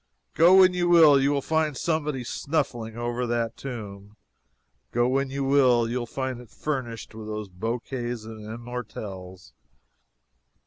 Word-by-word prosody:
Go 170 Hz, +3 st, +6 dB
when 185 Hz, -1 st, +7 dB
you 175 Hz, -1 st, 0 dB
will, 155 Hz, -5 st, +7 dB
you 140 Hz, +1 st, +2 dB
find 155 Hz, -1 st, 0 dB
somebody 150 Hz, -5 st, -1 dB
snuffling 120 Hz, -5 st, -2 dB
over 120 Hz, +1 st, -2 dB
that 115 Hz, -1 st, -1 dB
tomb. 105 Hz, -5 st, -8 dB, 0.8 s
Go 120 Hz, +1 st, +2 dB
when 135 Hz, +1 st, 0 dB
you 140 Hz, +1 st, -3 dB
will, 130 Hz, -4 st, +4 dB
you 120 Hz, 0 st, -3 dB
find 130 Hz, 0 st, -4 dB
it 120 Hz, -, -15 dB
furnished 125 Hz, -5 st, -4 dB
with 110 Hz, -1 st, -8 dB
those 105 Hz, -1 st, -5 dB
bouquets 120 Hz, +4 st, -4 dB
and 110 Hz, -1 st, -9 dB
immortelles. 105 Hz, -, -8 dB
120 Hz, 135 wpm, -26 LUFS, 110-140 Hz, 0.8 s, when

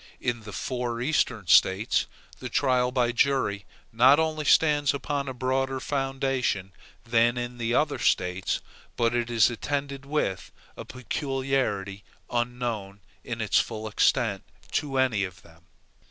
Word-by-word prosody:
In 120 Hz, -1 st, -1 dB
the 110 Hz, -1 st, -10 dB
four 120 Hz, +1 st, -3 dB
Eastern 125 Hz, -5 st, 0 dB
States, 95 Hz, +4 st, +4 dB, 0.3 s
the -, -, -6 dB
trial 125 Hz, -2 st, +2 dB
by 125 Hz, -2 st, +1 dB
jury 120 Hz, -6 st, +1 dB, 0.3 s
not 130 Hz, +5 st, +6 dB
only 155 Hz, -1 st, -1 dB
stands 145 Hz, -2 st, +4 dB
upon 140 Hz, 0 st, -3 dB
a 130 Hz, -, -3 dB
broader 130 Hz, +1 st, -1 dB
foundation 135 Hz, -8 st, -1 dB, 0.3 s
than 115 Hz, +1 st, +2 dB
in 120 Hz, 0 st, -5 dB
the 120 Hz, 0 st, 0 dB
other -, -, +1 dB
States, 90 Hz, +1 st, 0 dB, 0.4 s
but 115 Hz, 0 st, +2 dB
it 120 Hz, -1 st, -1 dB
is 115 Hz, 0 st, +4 dB
attended 140 Hz, +2 st, -3 dB
with 140 Hz, -11 st, -2 dB, 0.2 s
a -, -, -8 dB
peculiarity 130 Hz, -7 st, -2 dB, 0.3 s
unknown, 120 Hz, -5 st, -3 dB, 0.2 s
in -, -, -5 dB
its -, -, +3 dB
full 110 Hz, -1 st, -3 dB
extent, 110 Hz, -1 st, +1 dB, 0.3 s
to 140 Hz, -2 st, -1 dB
any 125 Hz, -6 st, +2 dB
of 90 Hz, -2 st, -7 dB
them. 80 Hz, 0 st, -20 dB
125 Hz, 140 wpm, -26 LUFS, 110-135 Hz, 0.4 s, not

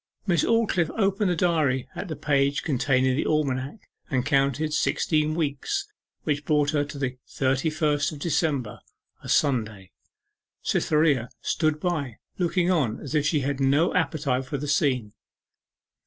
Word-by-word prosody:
Miss 175 Hz, -4 st, +2 dB
Aldclyffe 215 Hz, -8 st, +2 dB
opened 200 Hz, -1 st, +1 dB
the 175 Hz, -, +1 dB
diary 155 Hz, -7 st, +1 dB
at -, -, -5 dB
the 155 Hz, -, -4 dB
page 140 Hz, -1 st, +1 dB
containing 130 Hz, -2 st, +1 dB
the 145 Hz, -, -1 dB
almanac, 140 Hz, -, -1 dB, 0.2 s
and 130 Hz, -4 st, 0 dB
counted 145 Hz, +1 st, +1 dB
sixteen 155 Hz, 0 st, +1 dB
weeks, 165 Hz, -, -2 dB, 0.4 s
which 145 Hz, -1 st, -1 dB
brought 145 Hz, -1 st, +2 dB
her 145 Hz, -2 st, +1 dB
to 145 Hz, 0 st, -8 dB
the 130 Hz, -2 st, -3 dB
thirty 135 Hz, +3 st, 0 dB
first 150 Hz, -1 st, 0 dB
of 155 Hz, -, -8 dB
December 145 Hz, -7 st, -1 dB, 0.4 s
a -, -, -9 dB
Sunday. 110 Hz, -, 0 dB, 0.7 s
Cytherea 150 Hz, -6 st, +2 dB
stood 155 Hz, -2 st, 0 dB
by, 150 Hz, -9 st, -2 dB, 0.2 s
looking 180 Hz, 0 st, +1 dB
on 135 Hz, -11 st, +1 dB
as 145 Hz, -, -7 dB
if 150 Hz, -1 st, +2 dB
she 150 Hz, -3 st, +1 dB
had 140 Hz, +1 st, -2 dB
no 140 Hz, +5 st, +3 dB
appetite 145 Hz, -6 st, 0 dB
for 140 Hz, +2 st, -4 dB
the 145 Hz, +2 st, -5 dB
scene. 130 Hz, -7 st, +1 dB
145 Hz, 150 wpm, -25 LUFS, 135-160 Hz, 0.7 s, no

